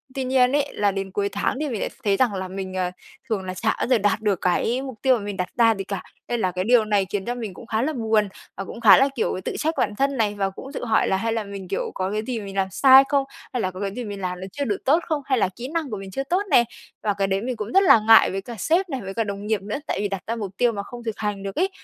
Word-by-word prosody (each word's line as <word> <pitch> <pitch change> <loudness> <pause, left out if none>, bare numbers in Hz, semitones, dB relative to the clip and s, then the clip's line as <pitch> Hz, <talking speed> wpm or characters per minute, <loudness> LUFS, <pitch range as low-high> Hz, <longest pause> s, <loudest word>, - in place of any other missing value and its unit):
Tuy 265 - -1
nhiên 255 -1 +3
ấy 290 -1 0
là 205 -1 +1
đến 195 0 -4
cuối 200 +1 -1
tháng 205 +6 -1
thì 300 -1 -1
mình 225 - -3
lại - - -2
thấy 200 -2 +2
rằng 245 -5 +2
là 190 -1 -3
mình, 190 0 -6
ờ, 185 -1 -1 0.4
thường 210 -4 -1
là 185 0 -4
xả 220 +5 0
bao - - 0
giờ 255 - +4
đạt 205 0 +1
được 205 -4 0
cái 225 +7 +1
mục 260 -5 -8
tiêu 260 -2 +4
mà 205 - -7
mình 205 -1 -5
đặt 180 - -1
ra 230 -2 +5
gì 195 - -4
cả, 195 -1 -5 0.2
nên 240 - -1
là 185 -4 +1
cái 185 +1 -2
điều 230 +1 +4
này 205 -2 +2
khiến 195 -1 -3
cho 245 +1 -2
mình 220 -6 -5
cũng 235 - -12
khá 220 0 0
là 305 +5 0
buồn 220 -5 +1 0.3
và 195 - -3
cũng 230 - -9
khá - - +9
là, 270 - +5
kiểu, 225 - -1
tự - - -3
trách 315 +1 0
bản 210 - 0
thân 275 +1 +1
này 210 -2 +1
và 195 -1 0
cũng 265 +8 -10
tự 245 - -4
hỏi 220 -1 +2
là 190 - +2
hay 225 +3 -1
là 225 -1 -1
mình, 200 -2 -8
kiểu, 195 - -2
có 185 +1 -2
cái 215 +1 -1
gì 245 -3 -2
mình 195 -1 -8
làm 195 -1 +1
sai 265 +7 +8
không, 280 -1 +3 0.3
hay 250 - 0
là 185 - -1
có 185 - -9
cái 200 -1 -2
gì 250 - -4
mình 205 -3 -6
làm 180 -1 -3
nó 190 - -5
chưa 285 - -3
được 205 -6 -3
tốt 300 +5 +5
không, 310 -2 -1
hay 265 -2 +1
là 190 - +2
kỹ 245 +2 -6
năng 325 -4 -1
của 215 - -4
mình 195 -1 -8
chưa 270 - -2
tốt 355 +8 0
nè? 240 - +7 0.4
Và 210 - +1
cái 195 0 0
đấy 195 0 0
mình 250 +2 -3
cũng 215 -1 -5
rất 390 - +6
là 325 - +7
ngại 225 0 +7
với 195 - -3
cả 235 +4 -8
sếp 350 - +1
này, 265 -4 -3
với 195 0 -6
cả 225 - 0
đồng 200 -1 -5
nghiệp 215 -2 0
nữa, 205 +6 -4
tại - - -1
vì 205 - 0
đặt 195 -2 -5
ra 230 - -1
mục 205 -5 -5
tiêu 245 -1 +3
mà 200 -2 -4
không 240 +3 -10
thực 225 -3 -4
hành 210 -2 -3
được 195 -1 -5
ấy. 375 +3 +1
215 Hz, 325 wpm, -23 LUFS, 195-250 Hz, 0.4 s, khá